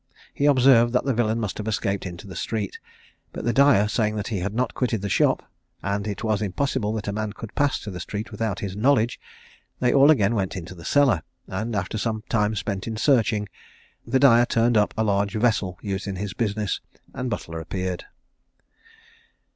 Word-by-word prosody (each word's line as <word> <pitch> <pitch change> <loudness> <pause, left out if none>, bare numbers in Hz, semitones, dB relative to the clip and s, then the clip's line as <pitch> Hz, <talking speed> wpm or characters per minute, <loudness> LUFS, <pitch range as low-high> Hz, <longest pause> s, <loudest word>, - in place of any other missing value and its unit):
He 145 - +1
observed 125 -4 +5
that 125 - +1
the 135 - +1
villain 115 -1 +1
must 110 -3 -3
have 105 - -4
escaped 100 -3 -1
into 85 0 -9
the 95 -3 -9
street; 105 +1 -3 0.5
but - - -6
the 120 - +1
dyer 135 -6 +5
saying 105 0 0
that 105 -2 -3
he 105 -5 -2
had 95 +3 -2
not 125 0 0
quitted 115 -5 -1
the 100 - -2
shop, - - +2 0.4
and 100 +1 -1
it 105 +1 -4
was 110 -2 0
impossible 110 +2 -1
that 110 -2 -4
a - - 0
man 110 -1 -3
could 115 - -9
pass 145 -1 +1
to 105 - -6
the 90 - -6
street 105 +5 -5
without 110 -3 -2
his 95 -2 -4
knowledge, 120 +1 +2 0.6
they 125 - +2
all 140 +1 +6
again 115 -8 +4
went 95 -4 -1
into 90 -1 -7
the 85 -2 -12
cellar, 140 - +3 0.2
and, 110 +4 -3
after 100 +2 -2
some 110 -1 -2
time 105 -2 +1
spent 100 0 -3
in 110 -1 -3
searching, 115 -5 +2 0.6
the 135 - +1
dyer 120 -3 +6
turned 115 +1 +2
up 105 -1 +3
a 110 - +2
large 100 -1 0
vessel 105 -5 +1
used 95 -1 -3
in 100 - -3
his 100 0 -4
business, 105 -3 -1 0.3
and 125 0 -3
Butler 80 -7 -4
appeared. 90 +2 -4
110 Hz, 200 wpm, -24 LUFS, 100-120 Hz, 0.6 s, all